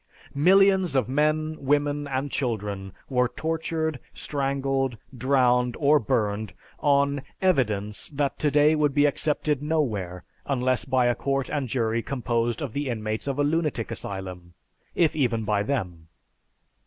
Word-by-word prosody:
Millions 190 Hz, +1 st, +4 dB
of 130 Hz, -5 st, +2 dB
men, 155 Hz, +3 st, +1 dB
women, 145 Hz, +1 st, 0 dB
and 135 Hz, +1 st, -2 dB
children 105 Hz, -6 st, -3 dB, 0.2 s
were 125 Hz, -2 st, +2 dB
tortured, 160 Hz, -1 st, -2 dB, 0.2 s
strangled, 135 Hz, -3 st, -1 dB, 0.2 s
drowned, 125 Hz, -1 st, +2 dB
or 150 Hz, 0 st, +5 dB
burned 110 Hz, -3 st, -1 dB, 0.3 s
on 140 Hz, -1 st, +2 dB, 0.2 s
"evidence" 110 Hz, -, 0 dB
that 145 Hz, -1 st, -2 dB
today 150 Hz, +1 st, +4 dB
would 150 Hz, -3 st, +1 dB
be 145 Hz, 0 st, +5 dB
accepted 150 Hz, 0 st, 0 dB
nowhere 110 Hz, -, -1 dB, 0.2 s
unless 130 Hz, -2 st, +1 dB
by 130 Hz, -1 st, +2 dB
a 120 Hz, -, +3 dB
court 135 Hz, +1 st, -2 dB
and 140 Hz, -4 st, -2 dB
jury 115 Hz, -1 st, 0 dB
composed 120 Hz, 0 st, -1 dB
of 130 Hz, -6 st, -5 dB
the 145 Hz, -1 st, -2 dB
inmates 110 Hz, 0 st, -3 dB
of 140 Hz, -1 st, -1 dB
a 145 Hz, -, +2 dB
lunatic 150 Hz, -6 st, -1 dB
asylum, 90 Hz, -3 st, -6 dB, 0.4 s
if 165 Hz, -3 st, +2 dB
even 120 Hz, -6 st, +1 dB
by 105 Hz, -1 st, +1 dB
them. 90 Hz, -9 st, -3 dB
135 Hz, 135 wpm, -25 LUFS, 115-145 Hz, 0.4 s, or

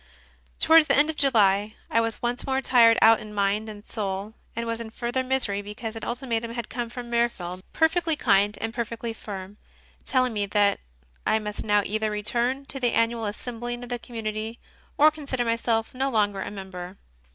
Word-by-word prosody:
Towards 320 Hz, -1 st, +6 dB
the -, -, +4 dB
end 300 Hz, +2 st, +4 dB
of -, -, -13 dB
July 210 Hz, -7 st, +3 dB
I 230 Hz, -, +2 dB
was 230 Hz, 0 st, -3 dB
once 240 Hz, +2 st, -2 dB
more 265 Hz, 0 st, +1 dB
tired 235 Hz, -4 st, +5 dB
out 225 Hz, 0 st, +7 dB
in 210 Hz, -1 st, -9 dB
mind 205 Hz, +2 st, +1 dB
and 210 Hz, 0 st, -10 dB
soul, 200 Hz, -1 st, -4 dB, 0.2 s
and 230 Hz, +1 st, -2 dB
was 230 Hz, 0 st, -3 dB
in 225 Hz, -, -6 dB
further 240 Hz, +3 st, -2 dB
misery 255 Hz, -6 st, 0 dB
because 220 Hz, +2 st, -6 dB
an 225 Hz, -, -7 dB
ultimatum 235 Hz, -2 st, -2 dB
had 235 Hz, -3 st, -4 dB
come 240 Hz, 0 st, -3 dB
from 240 Hz, 0 st, -8 dB
Mirfield, 195 Hz, -7 st, -1 dB
perfectly 325 Hz, 0 st, +2 dB
kind 205 Hz, -5 st, +3 dB
and 225 Hz, 0 st, -3 dB
perfectly 230 Hz, -1 st, -4 dB
firm, 200 Hz, -2 st, -8 dB, 0.5 s
telling 255 Hz, -2 st, +2 dB
me 205 Hz, -1 st, 0 dB
that 205 Hz, 0 st, +2 dB, 0.5 s
I -, -, +4 dB
must 210 Hz, -1 st, -4 dB
now 205 Hz, -1 st, +3 dB
either 215 Hz, +1 st, -1 dB
return 240 Hz, +6 st, 0 dB
to 270 Hz, -, -5 dB
the 245 Hz, -2 st, +1 dB
annual 230 Hz, 0 st, +1 dB
assembling 240 Hz, +3 st, -5 dB
of 245 Hz, -, -9 dB
the 245 Hz, -1 st, -3 dB
community 220 Hz, -1 st, -5 dB, 0.4 s
or 305 Hz, +2 st, +7 dB
consider 275 Hz, -5 st, -3 dB
myself 230 Hz, -1 st, 0 dB
no 265 Hz, +2 st, 0 dB
longer 205 Hz, -5 st, +1 dB
a -, -, -4 dB
member. 190 Hz, -2 st, -8 dB
230 Hz, 185 wpm, -26 LUFS, 210-245 Hz, 0.5 s, out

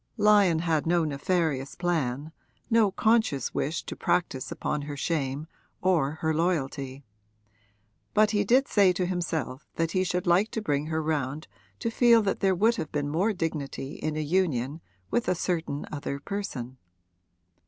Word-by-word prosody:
Lyon 205 Hz, -5 st, +5 dB
had 160 Hz, -2 st, 0 dB
no 170 Hz, -1 st, +3 dB
nefarious 145 Hz, -2 st, -1 dB
plan, 155 Hz, -5 st, -1 dB, 0.4 s
no 225 Hz, -2 st, +5 dB
conscious 215 Hz, -, +1 dB
wish 155 Hz, +3 st, -1 dB
to -, -, -6 dB
practise 135 Hz, -7 st, -1 dB
upon 150 Hz, -, -2 dB
her 145 Hz, 0 st, -6 dB
shame 140 Hz, -2 st, -1 dB, 0.3 s
or 165 Hz, -6 st, +2 dB
her 160 Hz, 0 st, +1 dB
loyalty; 140 Hz, -5 st, -1 dB, 1.1 s
but 215 Hz, 0 st, +5 dB
he 205 Hz, -1 st, +2 dB
did 255 Hz, +7 st, +3 dB
say 195 Hz, -3 st, +4 dB
to 180 Hz, +1 st, -1 dB
himself 160 Hz, -6 st, -3 dB
that 165 Hz, 0 st, 0 dB
he 185 Hz, +1 st, +1 dB
should 180 Hz, -1 st, -1 dB
like 180 Hz, +5 st, +3 dB
to -, -, -3 dB
bring 150 Hz, -7 st, -1 dB
her 160 Hz, 0 st, -1 dB
round 150 Hz, -1 st, -2 dB, 0.3 s
to 230 Hz, -, -2 dB
feel 235 Hz, -1 st, +5 dB
that 195 Hz, -, -1 dB
there 190 Hz, -2 st, +2 dB
would 225 Hz, +6 st, +3 dB
have 155 Hz, -, -4 dB
been 145 Hz, -1 st, -1 dB
more 180 Hz, +9 st, +1 dB
dignity 155 Hz, -6 st, -4 dB
in 155 Hz, 0 st, -3 dB
a -, -, 0 dB
union 155 Hz, -3 st, 0 dB, 0.3 s
with 240 Hz, -, +1 dB
a 180 Hz, -, +2 dB
certain 165 Hz, -5 st, -2 dB
other 145 Hz, -1 st, -4 dB
person. 140 Hz, -9 st, -5 dB
165 Hz, 160 wpm, -27 LUFS, 145-185 Hz, 1.1 s, Lyon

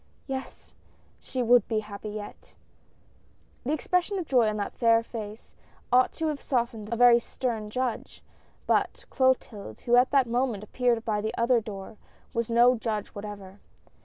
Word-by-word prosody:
"Yes, 265 Hz, -1 st, -7 dB, 0.5 s
she 255 Hz, -1 st, -3 dB
would 240 Hz, +1 st, +5 dB
be 220 Hz, -2 st, 0 dB
happy 210 Hz, 0 st, -8 dB
yet! 210 Hz, 0 st, -9 dB, 0.5 s
" -, -, -35 dB
The 270 Hz, -, -2 dB
expression 360 Hz, +5 st, 0 dB
of 360 Hz, -, -3 dB
joy 245 Hz, -6 st, +3 dB
on 210 Hz, -, -3 dB
that 205 Hz, -, -3 dB
fair 230 Hz, -1 st, +3 dB
face 220 Hz, -2 st, -8 dB, 0.4 s
ought 255 Hz, 0 st, +5 dB
to 325 Hz, -, -3 dB
have 295 Hz, -2 st, -4 dB
softened 235 Hz, -4 st, -2 dB
a -, -, +1 dB
very 240 Hz, 0 st, +7 dB
stern 230 Hz, -3 st, -4 dB
judge, 250 Hz, +1 st, -3 dB, 0.4 s
but -, -, 0 dB
Clotilde, 240 Hz, -, 0 dB
who 240 Hz, 0 st, +3 dB
at 250 Hz, +1 st, +5 dB
that 275 Hz, -2 st, +4 dB
moment 240 Hz, -3 st, -1 dB
appeared 235 Hz, +1 st, 0 dB
by 210 Hz, -2 st, 0 dB
the 220 Hz, +1 st, -3 dB
other 235 Hz, 0 st, +3 dB
door, 205 Hz, 0 st, -8 dB, 0.4 s
was 230 Hz, 0 st, -1 dB
no 240 Hz, +2 st, +5 dB
judge 220 Hz, -3 st, -3 dB
whatever. 200 Hz, -1 st, -9 dB
235 Hz, 160 wpm, -27 LUFS, 215-250 Hz, 0.5 s, very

